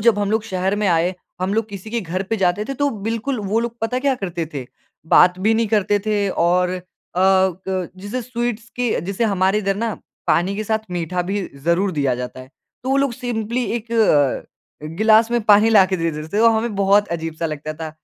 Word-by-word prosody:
जब 220 -1 +4
हम 205 0 0
लोग 220 0 +1
शहर 190 -1 -1
में - - +2
आए 175 +2 +2 0.3
हम 190 +3 0
लोग 225 0 0
किसी 200 +2 -8
के 235 - -1
घर 185 0 -3
पे 225 - +1
जाते 190 +2 +1
थे। 275 - -4
तो 285 +2 +1 0.2
बिल्कुल 230 +3 -2
वो 225 +2 +2
लोग 235 0 -4
पता 225 +3 -1
है - - 0
क्या 275 -1 +2
करते 175 -7 -4
थे, 130 -3 -5 0.5
बात 180 0 +6
भी 225 - +4
नहीं 225 0 +1
करते 205 -1 +2
थे 205 -2 +1 0.2
और 180 +1 +2
अ, 185 -1 -4 0.4
ग 190 -1 +2
जैसे 205 +6 -4
स्वीट्स 235 -2 -3
की 245 - -1 0.2
जैसे 200 +4 -1
हमारे 190 +2 +2
इधर 195 -1 0
ना 225 -1 -2 0.3
पानी 185 +4 +2
के 215 - -3
साथ 220 +1 +1
मीठा 175 +1 -2
भी 200 +3 -2 0.2
ज़रूर 180 +3 +2
दिया 140 -4 +1
जाता 125 +1 -6
है। 130 - -13 0.3
तो 260 - -3
वो 270 - +3
लोग 275 -3 +1
सिंपली 240 0 -2
एक 230 +1 -16
अ, 150 - 0
गिलास 220 +1 +5
में 240 0 +2
पानी 210 +2 +7
लाके 190 -3 +5
दे 165 -1 0
देते 155 0 -6
थे। 205 - -2
तो 230 - +7
हमें 225 -1 -1
बहुत 200 +1 +3
अजीब-सा 165 0 -4
लगता 155 0 -5
था 160 0 -6
200 Hz, 220 wpm, -20 LUFS, 180-225 Hz, 0.5 s, पानी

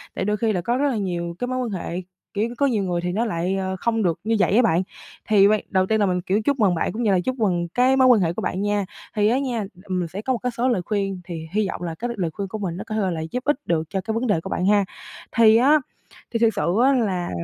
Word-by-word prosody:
Tại - - -2
đôi 210 +1 0
khi 225 0 +1
là 180 - -1
có 240 +7 0
rất 285 +2 +2
là 250 - -1
nhiều 170 -4 -3
cái 245 - -2
mối 255 0 -2
quan 250 -2 -2
hệ, 180 -2 -4 0.3
kiểu, 215 +3 0
có 280 - +2
nhiều 225 -7 +1
người 175 -2 -1
thì 180 0 -2
nó 220 +6 0
lại, 185 -3 -1
ờ, 190 -1 -2
không 225 +1 0
được 170 -4 0
như 225 +2 +1
vậy 195 - +3
á 240 - +6
bạn. 185 -7 +3 0.5
Thì 200 -2 +6
ban 215 +1 +3
đầu 190 -1 +2
tiên 220 +3 +1
là 205 - +3
mình, 180 -2 0
kiểu, 195 +4 0
chúc 275 +4 0
mừng 195 -5 +3
bạn, - - -1
cũng 235 +3 -3
như 215 - +3
là 185 - +3
chúc 255 +9 -2
mừng 180 -8 0
cái 255 +2 +4
mối 260 -1 +5
quan 245 -4 +6
hệ 170 -2 +1
của - - -4
bạn 185 - -2
nha. 205 -1 0 0.3
Thì 210 -1 +3
á 245 +4 +2
nha, 260 -4 -2
là, 210 - -2 0.2
ừm, 185 -3 -2
mình 175 - -2
sẽ 190 +5 -6
có 260 +4 0
một 240 - -2
cái 250 - 0
số 240 +2 -1
lời 230 -8 +1
khuyên, 195 -2 -2
thì 165 -2 -7
hy 210 0 +1
vọng 185 - -5
là 165 -2 -4
cái 240 - -2
lời 170 -4 -1
khuyên 200 +3 -4
của 215 - -5
mình 180 -4 -3
á 195 - -5
có 215 - -4
thể 195 -4 0
là 165 -2 -3
giúp 250 0 -3
ích 295 -2 +1
được 165 -2 +1
cho 195 - -2
cái 220 +4 -3
vấn 235 +3 -1
đề 200 -7 +1
của - - -7
bạn 180 - -1
ha. 200 0 +4 0.5
Thì 225 -1 +6
á, 285 +6 +5 0.5
thì 230 - -1
thiệt 225 -1 +3
sự 185 -3 0
á, 275 +2 +5
là, 195 -9 0
205 Hz, 315 wpm, -23 LUFS, 180-230 Hz, 0.5 s, á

